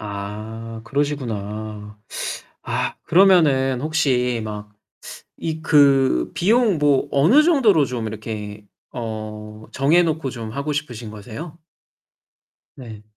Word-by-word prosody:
아 110 +2 -7
그러시구나. 110 -7 -4 0.6
아 - - -2
그러면은 150 -9 +4
혹시 130 -6 +1
막 105 -1 -7 0.7
이 160 -1 -4
그 135 - +4
비용 215 -1 +2
뭐 145 -2 +2
어느 170 - +5
정도로 245 - +4
좀 125 -4 -4
이렇게 105 -1 -6 0.3
어 110 -2 -7
정해 150 +6 +3
놓고 160 -4 -1
좀 115 -3 -7
하고 140 +5 -3
싶으신 125 -6 -5
거세요? 120 - -9 1.2
네. 115 -5 -10
125 Hz, 195 characters per minute, -21 LUFS, 110-150 Hz, 1.2 s, 어느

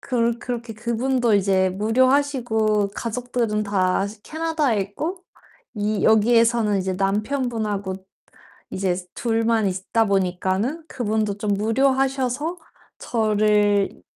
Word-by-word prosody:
그렇 235 -2 0
그렇게 235 -2 -5
그분도 235 +1 0
이제 190 -1 +2
무료하시고 225 -1 +1
가족들은 230 -2 -2
다 195 -1 +1 0.2
캐나다에 310 -8 -1
있고 305 - -4 0.6
이 210 -1 -1
여기에서는 225 -1 +4
이제 185 0 -2
남편분하고 210 0 -1 0.8
이제 185 -2 -1 0.2
둘만 225 -2 +1
있다 190 +5 0
보니까는 195 - -1
그분도 215 -3 -1
좀 205 -1 0
무료하셔서 265 - 0 0.4
저를 210 -2 +1
220 Hz, 255 characters per minute, -22 LUFS, 205-245 Hz, 0.8 s, 여기에서는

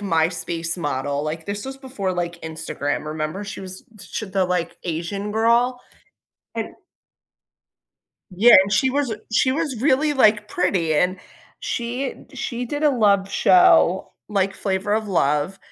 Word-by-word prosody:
MySpace 165 -2 -1
model, 145 -2 -2
like, 155 +2 -4
this 205 +2 -4
was 270 0 -7
before, 255 -9 -4
like, 175 -1 -3
Instagram, 160 -2 -4
remember? 155 +6 -4
She 200 - -7
was 185 -1 -9 0.2
ch 210 - -6
the, 190 0 +1
like, 180 -2 -2
Asian 180 +5 -3
girl, 235 +3 +2 0.8
and - - -4 1.6
Yeah, 205 +7 +7
and 195 +1 -4
she 260 +6 +3
was 280 -1 0
a 220 - -4
she 260 +3 +3
was 285 -6 -2
really, 295 +2 +3
like, 210 -6 +3
pretty 180 -4 0
and 180 +4 +1 0.4
she 245 +3 -3
d - - -17
she 240 0 -3
did 290 +5 -4
a 300 - +5
love 200 -6 +2
show, 185 -1 +4 0.2
like, 195 -2 0
Flavor 190 +1 -2
of 215 -1 -2
Love, 150 +1 +1
195 Hz, 150 wpm, -22 LUFS, 170-235 Hz, 1.6 s, Yeah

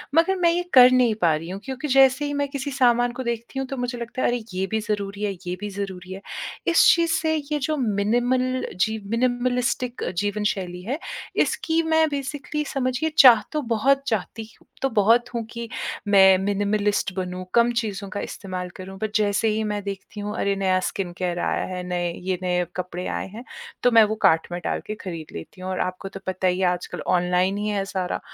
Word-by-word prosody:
मगर 335 +4 +4
मैं 345 -1 +3
ये 350 +1 +1
कर 255 -1 +9
नहीं 245 -4 +3
पा 165 -3 +4
रही 165 +3 -6
हूँ, 195 +1 -5
क्योंकि 265 +2 -4
जैसे 270 +1 +5
ही 290 - -2
मैं 285 0 0
किसी 280 0 -4
सामान 245 -2 +3
को 260 +1 -5
देखती 235 +3 -4
हूँ, 265 - -3
तो 270 - -5
मुझे 245 0 -3
लगता 235 +2 -5
है, - - +3
"अरे! 240 -2 -1
ये 190 +1 -1
भी 220 +3 -1
ज़रूरी 205 -1 -3
है, 205 - 0 0.2
ये 180 - -2
भी 210 - -3
ज़रूरी 190 -2 -6
है।" 195 - -8 0.5
इस 335 - +5
चीज़ 335 -1 +1
से 315 0 +1 0.2
ये 295 - +1
जो 310 +3 0
मिनिमल 245 +3 +1
जी, 220 +4 +1
मिनिमालिस्टिक 250 +1 0
जीवन 205 +1 -1
शैली 180 -2 -6
है, 260 +8 -2 0.5
इसकी 325 0 0
मैं 320 0 +3
बेसिकली 290 +1 -3
समझिए 265 +3 -1
चाह 250 -4 +9
तो 305 -1 -1
बहुत 275 +5 +3
चाहती 220 +1 -2 0.2
हूँ - - -24
तो 270 - +1
बहुत 230 +3 +3
हूँ 230 -1 -2
कि 235 -1 -6 0.4
मैं 190 -2 +7
मिनिमालिस्ट 205 0 0
बनूँ, 185 0 -4
कम 235 0 +4
चीज़ों 200 -2 -5
का 205 - -4
इस्तेमाल 185 -2 -5
करूँ। 190 +1 -9
पर 215 -1 -2
जैसे 210 +1 +2
ही 215 0 0
मैं 205 -1 -3
देखती 200 +1 -7
हूँ, 205 +1 -4
"अरे! 200 0 +1
नया 190 -1 +2
स्किन 185 -3 -4
केयर 175 -1 -2
आया - - 0
है, 180 - -4
नए 175 -1 -1 0.2
ये 185 -1 0
नए 180 -1 +1
कपड़े 180 0 -4
आए - - -5
हैं।" 235 - -7 0.4
तो 245 - +5
मैं 225 -1 +8
वो - - -3
कार्ट 160 0 +2
में 175 - -3
डाल - - -1
के 215 - -3
खरीद 165 -4 -6
लेती 135 - -11
हूँ 185 - -5
और 185 - -3
आपको 190 +1 -9
तो 195 - -9
पता 185 0 0
ही 180 +1 +1
है, 185 - +2
आजकल 180 0 -3 0.2
ऑनलाइन 180 +2 +1
ही 210 +1 -2
है 200 -2 -1
सारा। 185 -2 -3
215 Hz, 215 wpm, -24 LUFS, 190-255 Hz, 0.5 s, कर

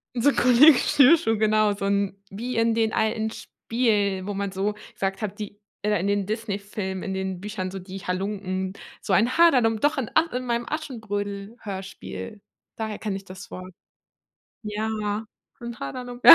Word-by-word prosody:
So 250 +4 +4
'n - - -4
Kollege 255 +3 +7
Schnürschuh, 275 -5 +5
genau, 215 0 +3
so 200 - -5
'n 200 -1 +1
wie 235 +5 -4
in 230 0 +3
den 225 -1 +2
alten 220 0 +1
Spielen, 210 -5 0
wo 205 - -2
man 200 0 -2
so 200 +2 -1 0.2
gesagt 195 0 -2
hat, 210 -1 -4
die 205 -1 -7 0.2
äh, 210 -2 +1
in 185 - -1
den 200 -1 +1
Disney-Filmen, 205 -3 -3
in 195 - -3
den 190 -1 -3
Büchern, 200 -2 -4
so 195 - -5
die 190 +1 -8
Halunken, 190 0 -2 0.3
so - - -2
ein 230 +7 +3
Haderlump, 250 -10 +5
doch 295 +1 +3
in 250 -5 -2
and 325 +1 +3
in 250 0 -3
meinem 235 0 0
Aschenbrödel-Hörspiel. 205 -6 -5 0.4
Daher 220 -1 -3
kenne 210 -3 -2
ich 195 - -8
das 185 -1 -10
Wort. 185 0 -8 0.9
Ja, 210 0 -2 0.3
so - - -11
ein 235 0 -6
Haderlump. 245 - -6
Ja. - - +14
210 Hz, 175 wpm, -25 LUFS, 195-230 Hz, 0.9 s, Ja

